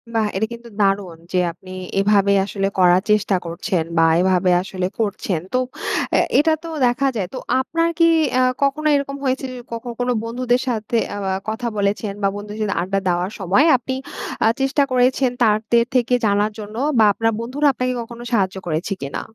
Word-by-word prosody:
বাহ! 220 -2 +2
এটা 215 +3 +1
কিন্তু 235 0 -11
দারুণ, 195 -4 0 0.2
যে 180 - +3
আপনি 185 +2 -14 0.3
এভাবে 200 0 +3
আসলে 195 -1 -2
করার 180 0 +5
চেষ্টা 210 -2 +2
করছেন, 170 +1 -2
বা 165 - +5 0.2
এভাবে 185 -1 +2
আসলে 185 -1 -3
করছেন। 200 -5 -1
তো 255 - +3 0.5
অ্যা - - +4 0.2
এটা 320 +1 +3
তো 330 - -6 0.2
দেখা 260 +3 +1
যায়। 190 -4 -2
তো - - -5 0.2
আপনার 330 +5 0
কি 335 - +6 0.3
আ - - +4 0.2
কখনো 300 +3 +1
এরকম 280 0 -2
হয়েছে 265 +1 0
যে, 250 - -8
কখন 235 +1 -5
কোন 245 0 0
বন্ধুদের 245 +2 0
সাথে 230 -1 -1 0.2
আ - - -5 0.3
কথা 235 +2 -3
বলেছেন, 200 0 -1
বা - - +4
বন্ধুদের 210 +1 -7
সাথে 210 - -1
আড্ডা 195 +2 -1
দেওয়ার 180 +3 0
সময় 195 - +3
আপনি, 260 +2 -4 0.5
আ - - +6
চেষ্টা 270 +1 +2
করেছেন 255 0 +2
তাদের 225 +2 +3
থেকে 250 0 +2
জানার 205 +1 +2
জন্য? 210 +1 -8 0.2
বা 215 - +7
আপনার 225 +2 +1
বন্ধুরা 270 +6 0
আপনাকে 255 0 -1
কখনো 235 +1 -9
সাহায্য 195 -4 +1
করেছে 165 +5 -1
কিনা? 140 0 -4
215 Hz, 180 wpm, -20 LUFS, 195-250 Hz, 0.5 s, বা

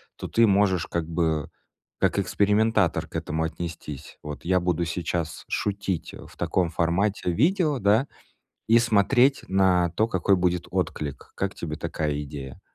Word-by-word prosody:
то - - -6
ты 115 - +4
можешь 95 -4 +3
как 85 -2 -2
бы 80 -3 0 0.5
как - - +2
экспериментатор 105 0 +2
к - - -15
этому 80 +1 -2
отнестись. 80 -3 -6
Вот, 75 -1 -7
я 90 +1 +3
буду 90 -1 0
сейчас 85 -1 -3
шутить 100 -4 -2
в - - -12
таком 90 -3 0
формате 90 +3 0
видео, 155 - +2
да, 110 +7 +3 0.6
и 115 - +6
смотреть 120 +4 +3
на 95 -2 +3
то, 110 +6 +1
какой 95 -2 +2
будет 90 -1 0
отклик. 70 -3 -3
Как 95 -1 -2
тебе 80 -2 -5
такая 75 -2 -2
идея? 70 -2 -8
90 Hz, 145 wpm, -25 LUFS, 80-105 Hz, 0.6 s, и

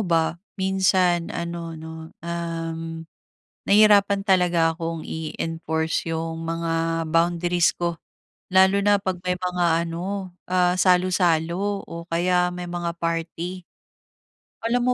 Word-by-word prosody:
ba 165 -1 +1 0.2
minsan 185 -3 +2
ano 170 -1 -5
'no, 160 0 -9 0.2
uhm, 165 -1 -4 0.6
nahirapan 205 -1 +5
talaga 175 -4 +3
akong 165 -1 -4
i-enforce 160 0 -2
yung 165 0 -3
mga 165 0 -1
boundaries 170 +1 +2
ko. 170 -1 -2 0.6
Lalo 190 +1 +5
na 205 0 +4
'pag 190 -2 -3
may 180 - +2
mga 175 -2 +1
ano, 185 +2 -4 0.2
ah, 180 -1 +3
salo-salo 180 +1 +2
o 170 0 -7
kaya 180 +1 +2
may 180 0 -5
mga 175 -1 -3
party. 170 +2 -3 1.0
Alam 245 +1 +1
170 Hz, 110 wpm, -24 LUFS, 165-185 Hz, 1.0 s, nahirapan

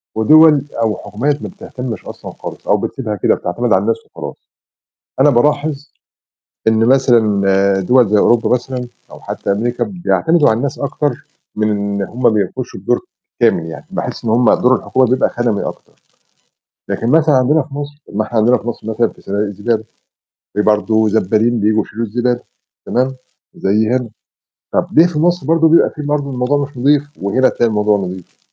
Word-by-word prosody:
ودوَل 150 +6 +6 0.2
أو 110 -2 +1
حكومات 135 +9 -2
ما - - -6
بتهتمِّش 125 - -7
أصلًا - - -9
خالص، - - -10
أو - - +3
بتسيبها 110 -6 -4
كده 100 - +2
بتعتمد 115 +6 -1
على 95 - +3
الناس 115 +2 0
وخلاص. - - -8 0.8
أنا 140 +2 +6
بالاحظ 145 +2 0 0.8
إن 110 0 +3
مثلًا 100 -7 +3
دوَل 125 +4 +3
زي 105 +1 +3
أوروبا 120 +2 +3
مثلًا، 125 0 -1 0.2
أو - - -12
حتّى - - -3
أمريكا، 120 +4 -1
بيعتمدوا 175 -4 +1
على 110 - +2
الناس 140 +2 -3
أكتر 140 -1 -3 0.3
من 110 0 +1
إن 100 -1 -2
هُم 120 +6 -6
ما - - +6
بيعملوش 105 -4 -2
الدور - - -1 0.4
كامل 80 - +2
يعني. 80 -3 -8
باحِس - - -5
إن 110 - 0
هُم 120 0 +4
دور 125 +1 +3
الحكومة 130 0 +1
بيبقى 130 +2 +2
خَدَمي 120 -4 -1
أكتر، - - -7 1.0
لكن 115 - -2
مثلًا 155 +2 +4
عندنا 135 +5 +3
في 140 0 -11
مصر 145 +1 -7
ما 110 - 0
إحنا 115 +2 -4
عندنا 120 +3 +4
في - - -10
مصر 115 -2 -5
مثلًا 110 +1 +1
في - - -18
صنادِق 100 +1 -3
الزبالة، 105 +3 -2 0.7
في 105 - +1
برضه 110 +1 +2
زبّالين 110 +3 +1
بييجوا 110 +1 +2
يشيلوا 115 +2 -4
الزبالة 120 +3 -1 0.5
تمام، 130 +2 0 0.4
زي 105 +3 +1
هنا. 125 0 0 0.7
طَب - - +1
ليه 165 +3 +6
في 165 -4 -4
مصر 175 -2 +1
برضه 165 0 +4
بيبقى 165 - +5
في 150 - -9
برضه 145 -1 -2
الموضوع 125 +3 0
مش 140 -1 -9
نضيف، 140 +3 +3 0.2
وهنا 100 +6 -1
تلاقي 120 - 0
الموضوع 105 -1 +2
نضيف؟ 95 -2 -7
120 Hz, 175 wpm, -16 LUFS, 105-140 Hz, 1.0 s, ودوَل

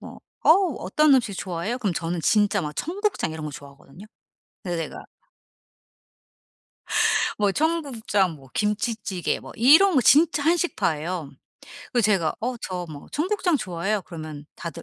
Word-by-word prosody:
뭐 - - -11 0.2
"어우 340 -4 +4
어떤 300 +8 +3
음식 230 -6 +1
좋아해요?" 185 +7 -3
그럼 205 -7 -1
저는 165 +1 -3
진짜 205 +2 +2
막 150 - -4
청국장 390 - -2
이런 160 -1 -6
거 150 - -4
좋아하거든요. 140 +7 -13 0.6
근데 175 -3 -3
내가 165 - -6 2.3
뭐 205 -2 +2
청국장 255 - 0
뭐 135 -3 -17
김치찌개 210 -3 -1
뭐 - - -11
이런 310 - +6
거 260 - +5
진짜 295 +4 +5
한식파예요. 180 - 0 0.6
그래서 240 -4 +2
제가 185 -7 +1
어 245 +2 -2
"저 180 -4 -5
뭐 145 -1 -10
청국장 355 0 +1
좋아해요." 195 0 -2
그러면 155 -4 -8
다들 170 - -7
205 Hz, 300 characters per minute, -24 LUFS, 170-285 Hz, 2.3 s, 이런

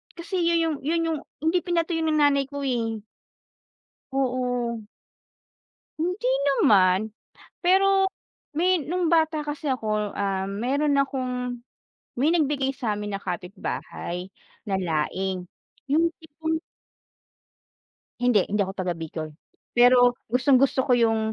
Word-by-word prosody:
kasi, 355 +2 -4
yun 335 0 +3
yung 325 -2 0
yun 330 +3 0
yung 325 -1 0 0.3
hindi 325 +3 +3
pinatuyo 340 -1 0
ng 310 - +2
nanay 285 -2 +4
ko, 285 0 -5
eh. 225 -4 -1 1.1
Oo. 250 -3 -1 1.2
Hindi 345 -4 -1 0.2
naman, 200 -4 +4 0.5
pero 385 +1 +4 0.5
may 360 +5 +3
nung 350 +2 0
bata 320 -2 +2
kasi 295 +1 -5
ako, 215 -4 -1
ah, 195 -1 -1
meron 260 +9 0
akong 250 -3 -2 0.6
may 300 +6 +3
nagbigay 280 -4 +1
samin 210 -4 -3
na 195 - -5
kapitbahay 180 -1 -5 0.4
na 200 - -1
laing 180 +3 -2 0.4
yung 320 +4 +3
tipong 320 0 -3 1.6
Hindi, 245 -6 +4
hindi 210 0 0
ako 190 0 -2
taga-Bicol, 165 -4 -4 0.4
pero 245 0 +6 0.2
gustong-gusto 260 +1 +3
ko 255 - +3
yung, 225 -2 +3
255 Hz, 115 wpm, -25 LUFS, 210-315 Hz, 1.6 s, pero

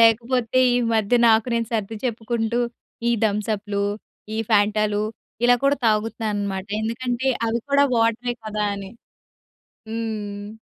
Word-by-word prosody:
లేకపోతే 230 +2 +3 0.2
ఈ - - +3 0.2
మధ్య 220 +3 +3
నాకు 225 0 +5
నేను 230 -1 0
సర్ది 220 -1 -2
చెప్పుకుంటూ, 235 0 -1 0.5
ఈ - - +3
థమ్సప్‌లు, 205 -1 -1 0.5
ఈ - - -2
ఫ్యాంటాలు 210 0 +3 0.4
ఇలా 245 0 +7
కూడా 280 +1 +4
తాగుతున్నానన్నమాట 210 -3 -1 0.2
ఎందుకంటే, 245 +3 -1 0.2
అవి 230 +1 0
కూడా 280 0 +5
వాటరే 230 +2 +1
కదా! 215 -1 -2
అని. 195 -1 -7 1.0
హ్మ్. 215 -2 -5
220 Hz, 115 wpm, -23 LUFS, 210-235 Hz, 1.0 s, ఇలా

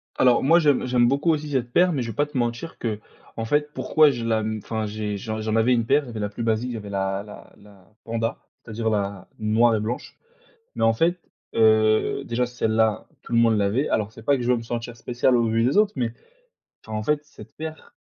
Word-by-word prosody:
Alors 125 -1 +4
moi, 165 +5 +5
j'aime 145 -5 +2
j'aime 125 -1 +3
beaucoup 140 +6 +2
aussi 150 -1 -2
cette 125 -3 -1
paire, 180 +4 +4
mais 135 - -1
je 115 - -4
vais 110 - -11
pas 145 - +2
te 145 -2 -7
mentir 120 +7 -2
qu'en 110 0 -6
fait, 150 +4 0
pourquoi 155 -1 +4
je 120 -3 -4
la, 110 -1 +1
mmh, 110 0 -3
enfin, 110 -1 -3
j'ai 105 -1 -4
j'en 110 +1 -4
j'en 110 0 -1
avais 115 +3 +3
une 115 -2 +1
paire, 145 +5 +3
il - - -12
y - - -8
avait 110 - -6
la 105 -1 -2
plus 115 +3 -6
basique, 115 +2 0
il - - -4
y - - -4
avait 105 -1 -8
la 95 0 -2
la 105 - -13
la 100 -2 -19 0.2
Panda. 115 0 -2 0.3
C'est-à-dire, 115 0 -3
la 100 -3 -2
noire 110 +2 +3
et 110 - 0
blanche. 115 +4 -5 0.6
Mais - - -1
en 115 - +5
fait, 170 +9 +1 0.4
heu, 110 -1 +3
déjà 125 +1 0
celle-là, 110 -3 0
tout - - -13
le 115 - +4
monde 115 -2 +4
l'avait. 105 +8 +1
Alors, 105 -1 -1
c'est 115 0 -13
pas 140 +2 +3
que 125 - -3
je 125 - +2
veux 125 - +3
me - - -5
sentir 120 0 -5
spécial 125 +2 +1
au 115 - +2
vu 115 +1 +1
des 135 +10 +2
autres, 210 -1 +4
mais 120 -3 -2 0.7
enfin 110 -1 -4
en 105 - -3
fait, 150 +4 0
cette - - -15
paire 160 0 -8
115 Hz, 245 wpm, -24 LUFS, 110-125 Hz, 0.7 s, moi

